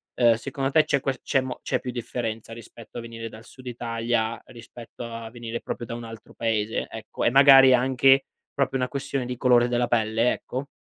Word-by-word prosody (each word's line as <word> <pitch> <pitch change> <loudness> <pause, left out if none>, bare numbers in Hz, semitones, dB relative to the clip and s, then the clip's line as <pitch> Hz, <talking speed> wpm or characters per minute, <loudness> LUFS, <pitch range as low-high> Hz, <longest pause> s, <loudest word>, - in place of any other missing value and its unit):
Ehm, 120 -2 +5
secondo 135 +3 -3
te 155 +1 +5
c'è 140 - +1
ques 135 -2 -3
c'è 135 - +1
mo 130 -1 -6
c'è - - -1
più 125 - -6
differenza 115 -2 -5
rispetto 115 0 -12
a - - -6
venire 115 -1 -7
dal 110 +1 -13
Sud 130 0 -15
Italia, 115 -1 -2
rispetto 120 -1 -11
a 115 -1 -7
venire 120 -1 -6
proprio 120 - -5
da 115 - -5
un 120 - -7
altro 115 -1 -11
paese? 110 -1 -1
Ecco, 110 -1 -7
e 120 - +3
magari 135 -1 +8
anche 135 +2 +4 0.3
proprio 135 -1 0
una 125 0 -1
questione 135 -2 -3
di 125 - -4
colore 120 -2 +4
della 120 0 0
pelle, 115 0 +1
ecco? 130 +3 -6
120 Hz, 200 wpm, -25 LUFS, 115-130 Hz, 0.3 s, magari